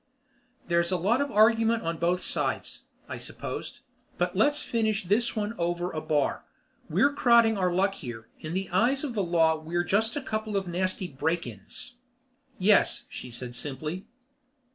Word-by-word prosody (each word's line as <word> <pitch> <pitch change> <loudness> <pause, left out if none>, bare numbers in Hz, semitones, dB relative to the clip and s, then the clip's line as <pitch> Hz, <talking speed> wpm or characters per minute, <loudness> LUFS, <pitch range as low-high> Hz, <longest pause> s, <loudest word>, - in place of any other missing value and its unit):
"There's 170 0 +2
a 185 - +2
lot 215 +10 +2
of 285 - -1
argument 225 0 +4
on 165 0 -2
both 175 +2 +1
sides," - - -1 0.2
I - - -6
supposed. - - -6 0.4
"But - - 0
let's 295 0 +3
finish 220 -2 0
this 210 +7 +1
one 210 0 -2
over 175 +1 -1
a 155 - -4
bar. 150 -3 0 0.5
We're 280 0 +3
crowding 235 -5 +5
our 185 -2 +1
luck 195 +3 +2
here. 120 - -8
In 160 +2 -5
the 190 0 -1
eyes 245 - +2
of 280 -5 -3
the 210 - 0
law 165 -3 +3
we're 170 +3 -1
just 220 +5 +1
a 290 - -2
couple 215 -4 -2
of 190 -2 -2
nasty 185 +2 -1
break 160 +3 -1
ins." 120 - -9 0.6
"Yes," 200 +2 +3
she 125 - -8
said 120 +1 -7
simply. 150 - -5
185 Hz, 165 wpm, -28 LUFS, 165-225 Hz, 0.6 s, crowding